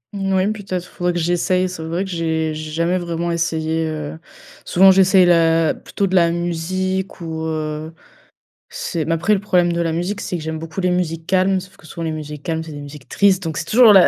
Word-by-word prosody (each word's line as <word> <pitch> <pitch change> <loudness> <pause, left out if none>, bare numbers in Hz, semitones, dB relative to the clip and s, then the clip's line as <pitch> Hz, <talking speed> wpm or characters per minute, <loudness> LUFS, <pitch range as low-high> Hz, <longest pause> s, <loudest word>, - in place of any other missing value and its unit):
Moui, 195 0 +1
peut-être, 190 -4 -4
faudrait 180 0 -2
que 175 - -1
j'essaie. 175 +2 +1
C'est 180 -3 -7
vrai 165 +4 -2
que 195 - -7
j'ai 160 -2 -1
j'ai 155 0 -6
jamais 170 +3 0
vraiment 170 0 -2
essayé, 160 -1 -1
heu. 155 0 -5 0.4
Souvent 190 +2 +6
j'essaie 190 0 +5
la 165 -2 +4
plutôt 200 - -3
de 190 - -3
la 170 -3 +5
musique 185 +3 -2
ou, 160 -1 -4
heu, 155 0 -3 0.8
c'est 160 -3 -3
mais 165 - 0
après 165 +6 +2
le - - -1
problème 180 -4 +2
de 170 - -2
la 165 -1 0
musique, 180 +5 -2
c'est 180 - -3
que 160 - -7
j'aime 160 0 -3
beaucoup 165 +4 -5
les 180 - +2
musiques 165 -2 -1
calmes. 190 0 +2
Sauf 185 0 -13
que - - -18
souvent 165 +2 -7
les 160 - -1
musiques 150 -2 -6
calmes, 160 +1 -2
c'est 160 - -9
des 145 -1 -7
musiques 145 -1 -11
tristes, 195 -1 +3
donc 160 -2 -3
c'est - - -3
toujours 225 +2 +7
la 190 -3 +8
170 Hz, 220 wpm, -20 LUFS, 160-185 Hz, 0.8 s, la